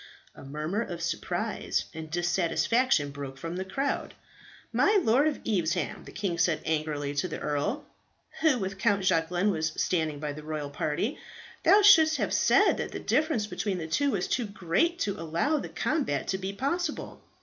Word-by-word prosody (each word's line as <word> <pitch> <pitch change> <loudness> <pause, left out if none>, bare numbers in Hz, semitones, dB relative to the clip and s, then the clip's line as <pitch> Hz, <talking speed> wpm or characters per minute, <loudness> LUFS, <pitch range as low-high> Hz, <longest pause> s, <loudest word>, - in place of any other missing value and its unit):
A - - -13
murmur 155 +9 -3
of 175 -7 -5
surprise 175 +5 -2
and 160 -1 -7
dissatisfaction 175 - +1
broke 140 -1 -7
from 165 +5 -5
the 185 - -2
crowd. 270 +9 -2 0.6
"My 415 +1 +4
Lord 255 +7 +4
of 300 - -1
Evesham," 180 -4 -1
the - - -10
king 185 -5 -3
said 170 -2 +2
angrily 150 -2 -1
to 145 +5 -1
the - - -5
earl, 200 - -2 0.5
who 315 -5 +4
with 195 -2 -4
Count 200 -3 +2
Jacquelin 175 +3 +2
was 160 -3 -1
standing 160 -4 0
by 150 -1 -3
the 155 - -8
royal 150 -2 -5
party, 160 - -2 0.4
"thou 415 +1 +6
shouldst 320 -6 +7
have - - -1
said - - +4
that - - -4
the - - -4
difference 310 -9 +1
between 205 -2 -2
the 165 - -4
two 280 - +1
was - - -1
too 240 -4 -1
great 200 - 0
to 200 -4 -1
allow 170 - 0
the - - -6
combat 275 - -1
to 190 - 0
be 190 0 -3
possible. 295 - -3
185 Hz, 175 wpm, -28 LUFS, 160-250 Hz, 0.6 s, shouldst